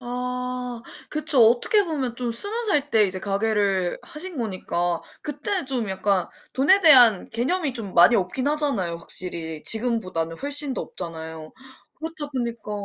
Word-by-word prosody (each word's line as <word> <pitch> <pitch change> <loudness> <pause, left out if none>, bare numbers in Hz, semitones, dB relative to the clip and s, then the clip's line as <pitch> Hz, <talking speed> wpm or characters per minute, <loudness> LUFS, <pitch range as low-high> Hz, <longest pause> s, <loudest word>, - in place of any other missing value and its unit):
아 250 0 -4 0.3
그쵸. 290 -5 +5
어떻게 405 - +4
보면 270 -8 -3
좀 245 -2 -2
20 405 - 0
살 290 -5 +1
때 215 -2 +4
이제 185 0 -4
가게를 200 -2 0
하신 345 +1 -7
거니까 175 -5 -2 0.2
그때 315 +5 -2
좀 250 -6 -1
약간 190 -1 -1 0.2
돈에 300 +10 +4
대한 250 - +6
개념이 280 +6 -1
좀 220 -6 -5
많이 175 +7 +6
없긴 215 +7 -1
하잖아요 275 - -1
확실히. 165 -3 -5
지금보다는 185 -8 0
훨씬 285 0 +1
더 - - -3
없잖아요. 160 -2 -8 0.4
그렇다 315 -2 -7
보니까 235 -5 -5
240 Hz, 295 characters per minute, -23 LUFS, 190-285 Hz, 0.4 s, 대한